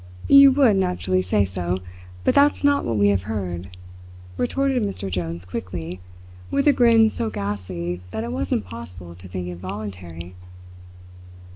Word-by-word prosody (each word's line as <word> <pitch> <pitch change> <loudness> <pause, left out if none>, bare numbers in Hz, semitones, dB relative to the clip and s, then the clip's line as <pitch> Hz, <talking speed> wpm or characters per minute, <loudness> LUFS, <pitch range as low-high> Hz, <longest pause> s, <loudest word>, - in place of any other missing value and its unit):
"You 275 0 +9
would 260 -7 +4
naturally 95 - 0
say 95 +2 +1
so, 90 -1 -2 0.5
but - - +3
that's 285 +1 +4
not 285 0 +3
what 115 -2 -1
we 100 0 +4
have 100 -2 +2
heard," 95 -3 -5 0.6
retorted 270 - 0
Mr. 195 - -2
Jones 85 0 -4
quickly, 90 -1 -6 0.5
with 280 +1 +1
a 290 - +7
grin 230 -3 +5
so 230 -2 -2
ghastly 90 - -4
that 110 +4 -4
it 120 - -4
was 90 +2 -3
impossible 90 -5 -5
to 90 +2 -13
think 90 -1 -5
it 90 -1 -6
voluntary. 90 -3 -7
95 Hz, 150 wpm, -23 LUFS, -, 0.6 s, You